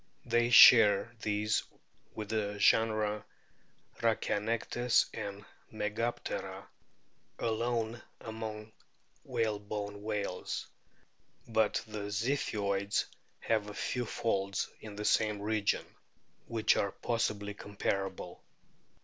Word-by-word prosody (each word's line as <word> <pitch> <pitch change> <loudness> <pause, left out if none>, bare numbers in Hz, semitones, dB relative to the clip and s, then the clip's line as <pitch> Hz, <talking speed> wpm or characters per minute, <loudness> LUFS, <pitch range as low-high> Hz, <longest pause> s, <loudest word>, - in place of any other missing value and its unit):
They 120 0 +2
share 115 -3 +8
these 105 +1 +1 0.5
with 105 -2 -5
the 105 -2 -1
genera 110 -1 +3 0.8
Rhachianectes 115 +3 +1
and 100 -1 -6 0.3
Megaptera 110 +3 -3 0.7
alone 115 0 -1 0.2
among 110 -1 -6 0.5
whalebone 105 -2 -3
whales; 105 -3 -3 0.8
but 110 -2 +1
the 105 -2 -5
Ziphioids 100 -3 0 0.4
have 110 -2 0
a 105 - -8
few 120 +3 -2
folds 100 -4 -1
in 105 -2 -9
the 105 +1 -5
same 105 -1 +2
region, 105 0 0 0.6
which 110 -2 +2
are 100 - 0
possibly 105 -3 -1
comparable. 100 -3 -4
105 Hz, 90 wpm, -32 LUFS, 100-115 Hz, 0.8 s, share